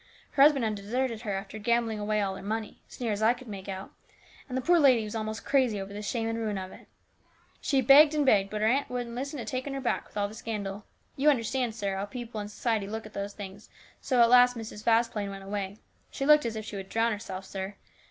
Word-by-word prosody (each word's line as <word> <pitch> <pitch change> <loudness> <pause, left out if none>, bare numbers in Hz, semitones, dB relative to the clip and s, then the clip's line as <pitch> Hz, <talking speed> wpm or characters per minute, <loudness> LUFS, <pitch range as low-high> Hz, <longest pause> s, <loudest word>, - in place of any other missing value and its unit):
Her 275 - +1
husband 280 -4 +6
had 215 - 0
deserted 225 +3 -2
her 210 -4 -3
after 195 +2 -6
gambling 230 0 +1
away 210 0 0
all 195 -1 -1
her - - -8
money, 215 +1 -4
as - - -13
near 235 -3 -1
as 205 0 -2
I 225 +3 +4
could 250 +1 -13
make 200 -2 -7
out, 190 0 -6 0.6
and 255 - -2
the - - 0
poor 345 +4 +5
lady 260 -6 +5
was 210 - -6
almost 220 -1 -4
crazy 255 -7 +2
over 195 +1 -6
the 205 - -5
shame 225 +2 -2
and 225 0 -2
ruin 215 -3 -2
of 185 0 -6
it. - - -14 0.7
She 275 -2 +2
begged 290 +4 +7
and 295 -1 +2
begged, 200 -6 +4
but 210 0 -4
her 215 - +3
aunt 270 +5 +1
wouldn't 245 -1 -4
listen 275 +4 -4
to 240 - -5
taking 255 +5 -3
her - - -2
back, 260 - -1
with - - -12
all 205 0 +1
the 205 - -11
scandal. 210 -2 -5 0.3
You 285 +3 +4
understand, 245 -3 0
sir, 200 -3 -2
how 195 - -2
people 230 -1 -6
in 205 - -6
society 215 -1 -1
look 220 +2 -5
at 215 - -12
those 200 0 -4
things, 200 0 -9 0.3
and - - -36
so 255 -3 +4
at 235 0 +6
last 245 0 +6
Mrs. 215 -2 -7
Vasplaine 225 -3 +2
went 195 0 -8
away. 200 0 -4 0.3
She 275 - -3
looked 300 -3 +6
as 225 - -4
if 215 -1 -5
she 210 - -6
would 195 0 -7
drown 230 +1 +1
herself, 195 -2 -5
sir. 195 +1 -5
220 Hz, 255 wpm, -28 LUFS, 205-245 Hz, 0.7 s, begged